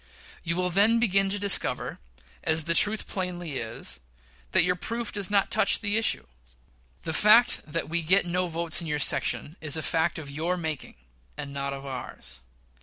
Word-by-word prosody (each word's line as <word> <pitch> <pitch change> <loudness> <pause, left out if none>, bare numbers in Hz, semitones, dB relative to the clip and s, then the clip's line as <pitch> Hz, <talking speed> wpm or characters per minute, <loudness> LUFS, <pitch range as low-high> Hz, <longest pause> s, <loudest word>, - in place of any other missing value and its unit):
You 170 -1 -2
will 180 0 -1
then 205 +5 +4
begin 195 -4 +2
to 200 - -2
discover, 200 -1 +1 0.4
as 160 0 +1
the 170 - 0
truth 210 +5 +5
plainly 175 -6 -4
is, 115 -2 -4 0.5
that - - +4
your 180 +1 +1
proof, 230 +6 -4
does 205 -2 -2
not 200 -1 +1
touch 220 - +3
the 205 -1 -2
issue. 225 0 +1 0.8
The 160 - -3
fact 215 +7 +5
that 165 +2 -3
we 170 +1 -1
get 185 +5 +3
no 180 +1 -1
votes 170 0 0
in 165 - -6
your 150 -1 -1
section 150 +1 -1
is 155 -1 +3
a 155 - -3
fact 165 +1 0
of 155 -3 -7
your 165 +5 -2
making, 160 -5 -5 0.4
and 140 - -6
not 140 0 -3
of 140 0 -7
ours. 95 - -7
170 Hz, 180 wpm, -26 LUFS, 155-200 Hz, 0.8 s, truth